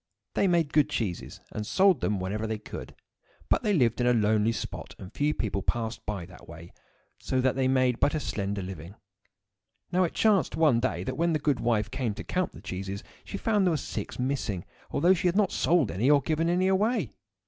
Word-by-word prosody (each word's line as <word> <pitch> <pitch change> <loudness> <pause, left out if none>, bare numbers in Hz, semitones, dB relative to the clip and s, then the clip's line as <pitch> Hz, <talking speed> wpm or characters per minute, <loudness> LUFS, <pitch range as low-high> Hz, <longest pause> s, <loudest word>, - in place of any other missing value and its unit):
They 200 - +2
made 170 -5 +1
good 150 -1 +4
cheeses, 110 -11 -3
and 105 - -4
sold 185 - +3
them 105 -2 0
whenever 105 +4 -2
they 110 0 -2
could; 105 - -9 0.5
but - - +3
they 210 - +1
lived 125 - +2
in 120 - +2
a 125 - +5
lonely 110 0 +3
spot, 110 - -6
and 95 +3 -11
few 145 +1 +1
people 100 -8 -2
passed 115 +1 -2
by 100 -5 -3
that 90 - -15
way, 85 +1 -11 0.5
so 130 - -1
that 130 0 +2
they 130 -1 +1
made 130 -2 +2
but 145 - +2
a - - 0
slender 100 -6 -3
living. 90 0 -8 1.0
Now 185 +1 +3
it 170 - -1
chanced 210 -5 +3
one 150 -7 +4
day 130 +2 -1
that 130 0 -4
when 170 +1 +2
the - - +2
good 145 -3 0
wife 115 -3 0
came 130 -5 -2
to - - -6
count 185 -1 -1
the - - -12
cheeses 95 +2 -5 0.2
she - - -6
found 220 +1 0
that 195 - +3
there 175 - +3
were - - +1
six - - -5
missing, 125 -8 -2 0.2
although 175 +6 +4
she 180 0 0
had 175 +2 +1
not 210 -2 +3
sold 160 - +2
any 105 +10 +1
or 145 -1 +6
given 160 +1 0
them 180 +2 +2
away. 210 +6 +1
130 Hz, 220 wpm, -28 LUFS, 105-165 Hz, 1.0 s, or